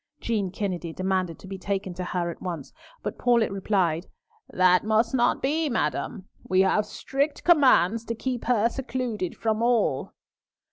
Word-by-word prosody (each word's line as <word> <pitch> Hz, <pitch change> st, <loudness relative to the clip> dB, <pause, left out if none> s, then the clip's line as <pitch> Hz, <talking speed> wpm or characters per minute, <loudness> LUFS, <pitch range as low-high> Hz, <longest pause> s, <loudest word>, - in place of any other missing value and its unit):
Jean 210 Hz, -5 st, -1 dB
Kennedy 180 Hz, -3 st, -3 dB
demanded 185 Hz, -1 st, -1 dB
to -, -, -14 dB
be 190 Hz, 0 st, -7 dB
taken 195 Hz, -1 st, -3 dB
to 180 Hz, +1 st, -5 dB
her 175 Hz, -1 st, -2 dB
at -, -, -12 dB
once, 170 Hz, -6 st, -5 dB, 0.3 s
but -, -, -4 dB
Paulett 235 Hz, -4 st, +3 dB
replied, 190 Hz, -4 st, 0 dB, 0.4 s
"That 180 Hz, -1 st, +4 dB
must 220 Hz, +2 st, +2 dB
not 245 Hz, -2 st, +2 dB
be, 305 Hz, +3 st, +1 dB
madam. 220 Hz, -4 st, -2 dB, 0.2 s
We 185 Hz, 0 st, +4 dB
have 205 Hz, +2 st, +2 dB
strict 280 Hz, +6 st, -2 dB
commands 255 Hz, -, +4 dB
to 230 Hz, -, -3 dB
keep 245 Hz, +1 st, -3 dB
her 230 Hz, -2 st, +3 dB
secluded 240 Hz, -6 st, -3 dB
from 220 Hz, -1 st, 0 dB
all." 230 Hz, -, +1 dB
210 Hz, 155 wpm, -26 LUFS, 185-240 Hz, 0.4 s, That